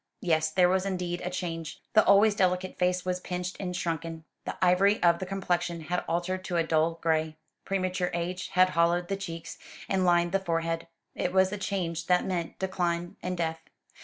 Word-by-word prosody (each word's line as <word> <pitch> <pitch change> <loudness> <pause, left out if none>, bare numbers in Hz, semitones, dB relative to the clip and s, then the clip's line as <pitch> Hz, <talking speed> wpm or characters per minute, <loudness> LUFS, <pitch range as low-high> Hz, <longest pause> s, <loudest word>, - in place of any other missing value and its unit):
Yes, 160 -5 +2
there 180 +3 +4
was 185 +1 +2
indeed 180 -2 -2
a 180 - -2
change. 165 -3 -4
The 215 - +6
always 205 +2 +6
delicate 185 -1 0
face 180 0 +1
was 180 0 -1
pinched 180 0 -4
and 180 -2 -3
shrunken. 165 -2 -3 0.2
The - - -4
ivory 190 +4 +4
of 170 -1 +5
the 185 - -4
complexion 175 -3 -1
had 175 +3 -2
altered 180 +2 -1
to 175 - -1
a 165 - +3
dull 165 0 +1
gray. 160 -1 +1 0.3
Premature 185 -2 -1
age 175 +1 -3
had 185 0 +5
hollowed 175 0 +2
the 195 - 0
cheeks, 170 -4 -7 0.3
and 190 -1 +1
lined 175 -1 +3
the 195 - +2
forehead. 165 -2 -2 0.3
It 180 - -1
was 190 0 +4
a - - -2
change 170 -4 -2
that 180 -1 +3
meant 175 -3 -3
decline 175 -2 -1
and 180 0 -3
death. 160 -1 -1
180 Hz, 190 wpm, -28 LUFS, 170-185 Hz, 0.3 s, The